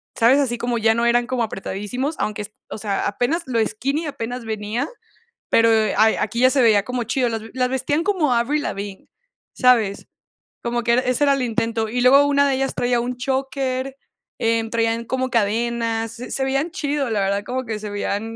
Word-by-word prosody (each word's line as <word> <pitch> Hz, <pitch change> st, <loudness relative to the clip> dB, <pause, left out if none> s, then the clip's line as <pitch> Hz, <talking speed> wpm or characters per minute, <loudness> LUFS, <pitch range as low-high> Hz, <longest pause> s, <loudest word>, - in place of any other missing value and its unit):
¿sabes? 240 Hz, +5 st, +5 dB
Así 240 Hz, -4 st, 0 dB
como 240 Hz, -1 st, -1 dB
ya 225 Hz, 0 st, +3 dB
no 235 Hz, +1 st, 0 dB
eran 240 Hz, 0 st, +3 dB
como 255 Hz, -1 st, -2 dB
apretadísimos, 220 Hz, +8 st, -4 dB
aunque 210 Hz, -1 st, -2 dB, 0.2 s
o -, -, -6 dB
sea, 205 Hz, -2 st, -1 dB
apenas 245 Hz, +11 st, 0 dB
lo 230 Hz, -3 st, +1 dB
skinny 275 Hz, +9 st, -2 dB
apenas 245 Hz, -4 st, -5 dB
venía, 220 Hz, +5 st, -2 dB, 0.6 s
pero, 230 Hz, 0 st, +4 dB
eh, 220 Hz, -2 st, +2 dB
a 220 Hz, 0 st, +3 dB
aquí 225 Hz, +3 st, -3 dB
ya 255 Hz, +1 st, +6 dB
se 265 Hz, -2 st, +2 dB
veía 210 Hz, -3 st, +5 dB
como 250 Hz, 0 st, -3 dB
chido, 250 Hz, 0 st, 0 dB
las 225 Hz, -1 st, -4 dB
las 250 Hz, -1 st, 0 dB
vestían 290 Hz, +4 st, 0 dB
como 350 Hz, -10 st, +1 dB
Avril 280 Hz, +6 st, +1 dB
Lavigne, 200 Hz, -1 st, -5 dB, 0.5 s
¿sabes? 230 Hz, -6 st, +2 dB, 0.5 s
Como 240 Hz, 0 st, -2 dB
que 235 Hz, 0 st, +3 dB
ese 255 Hz, +3 st, +1 dB
era 280 Hz, -1 st, +4 dB
el 270 Hz, -, -2 dB
intento, 225 Hz, -1 st, -1 dB
y 245 Hz, +2 st, -1 dB
luego 275 Hz, +3 st, +6 dB
una 280 Hz, 0 st, +3 dB
de 270 Hz, -, +1 dB
ellas 270 Hz, 0 st, -1 dB
traía 245 Hz, -1 st, +1 dB
un 245 Hz, +1 st, -3 dB
choker, 265 Hz, 0 st, -2 dB, 0.4 s
em, 225 Hz, 0 st, +1 dB
traían 230 Hz, 0 st, 0 dB
como 260 Hz, +1 st, -1 dB
cadenas, 230 Hz, 0 st, 0 dB
se 235 Hz, +2 st, -8 dB
se 265 Hz, -, -1 dB
veían 275 Hz, +5 st, 0 dB
chido, 290 Hz, -6 st, -2 dB
la 210 Hz, -3 st, 0 dB
verdad, 200 Hz, +1 st, 0 dB
como 255 Hz, 0 st, -3 dB
que 220 Hz, -2 st, -4 dB
se 210 Hz, 0 st, -6 dB
veían 205 Hz, +2 st, -3 dB
240 Hz, 195 wpm, -21 LUFS, 225-265 Hz, 0.6 s, ya